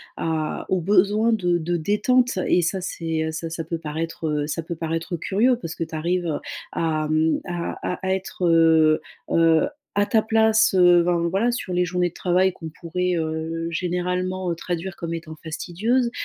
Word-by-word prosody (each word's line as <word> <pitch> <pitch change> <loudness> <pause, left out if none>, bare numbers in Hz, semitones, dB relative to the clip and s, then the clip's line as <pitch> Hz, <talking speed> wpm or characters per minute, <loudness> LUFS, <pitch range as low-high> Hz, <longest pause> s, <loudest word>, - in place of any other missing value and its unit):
à 160 -1 -2
aux 185 - +2
besoins 205 +5 +3
de 180 -5 +1
de 175 +1 -2
détente. 210 +6 +2
Et 180 - +4
ça 185 +3 -1
c'est, 165 -3 -3
heu, 160 - -2
ça 165 +1 -5
ça 165 0 -5
peut 165 +1 -3
paraître, 160 +1 -5
heu, 150 0 -1
ça 165 +2 -3
peut 170 +2 -5
paraître 165 +1 -3
curieux 235 +9 +2
parce 165 -8 -6
que - - -2
tu 160 - -7
arrives, 175 +3 -1
heu, 155 -3 -1 0.3
à, 155 -2 -1
mmh, 155 +1 +2
à 175 0 -4
à 190 - -2
être, 190 -1 -3
heu, 160 -2 +5 0.3
heu, 165 -1 +4 0.3
à 205 0 +2
ta 220 -2 +3
place, 220 -1 +3
heu, 175 -1 +6
ben 170 -1 +1
voilà, 205 +7 +1
sur 240 -6 -4
les 180 0 +2
journées 180 0 0
de - - -24
travail 185 +1 +2
qu'on 165 -2 -8
pourrait, 180 +2 -1
heu, 160 0 -2
généralement, 180 +1 -2
heu, 170 - -2
traduire 175 +2 -4
comme 170 0 -5
étant 160 -1 -6
fastidieuses. 210 +10 0
175 Hz, 190 wpm, -23 LUFS, 160-185 Hz, 0.3 s, heu